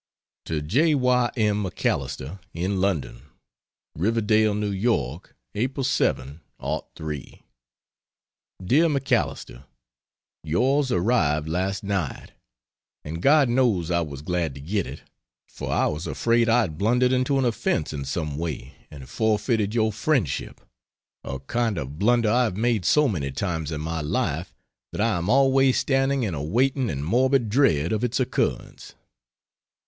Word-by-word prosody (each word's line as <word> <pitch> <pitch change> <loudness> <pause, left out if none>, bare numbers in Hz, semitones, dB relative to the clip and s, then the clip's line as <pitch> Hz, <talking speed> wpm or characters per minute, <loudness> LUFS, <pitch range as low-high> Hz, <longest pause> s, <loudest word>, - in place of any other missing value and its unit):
To 75 -2 -2
J. 145 - +2
Y. 125 -2 +2
M. 105 -2 +1
MacAlister, 90 -3 -3 0.2
in 95 +3 -1
London: 80 -11 -1 0.7
RIVERDALE, 110 +3 +2
NEW 105 -1 -1
YORK. 95 - -2 0.2
April, 130 +6 -2
7, 70 - 0 0.2
'03. 75 -3 -6 1.2
DEAR 155 - +4
MACALISTER, 135 - -1 0.8
Yours 130 - +1
arrived 85 -7 +1
last 95 +4 -2
night, 95 -8 -3 0.7
and 80 +3 -5
God 145 - +5
knows 120 -9 +1
I 85 0 +2
was 70 -3 -6
glad 85 -4 -2
to - - -9
get 95 +7 -2
it, - - -9 0.4
for - - -6
I - - +2
was 75 +4 -3
afraid 115 0 +1
I 120 +2 +5
had 80 -8 -4
blundered 125 +5 +3
into 130 +2 +1
an 135 - +1
offence 110 -9 -1
in 70 -2 -4
some 75 +1 -3
way 80 -4 -5 0.2
and 70 -3 -11
forfeited 110 - 0
your 110 -1 +2
friendship 110 - -1 0.6
a 65 - -4
kind 115 - -1
of 70 +1 -6
blunder 115 0 +3
I 125 +2 +3
have 100 -5 -3
made 115 -4 +1
so 150 - +4
many 75 - -2
times 80 0 -3
in 75 -1 -4
my 80 +1 -3
life 75 - -2 0.4
that - - -7
I 110 -4 +2
am 85 +4 -3
always 135 0 +4
standing 135 -1 +1
in 100 -6 -2
a 70 - -3
waiting 125 - +1
and 70 -2 -3
morbid 125 - +2
dread 85 - +2
of 110 +2 -1
its 125 +2 0
occurrence. 130 - -2
105 Hz, 145 wpm, -24 LUFS, 80-125 Hz, 1.2 s, God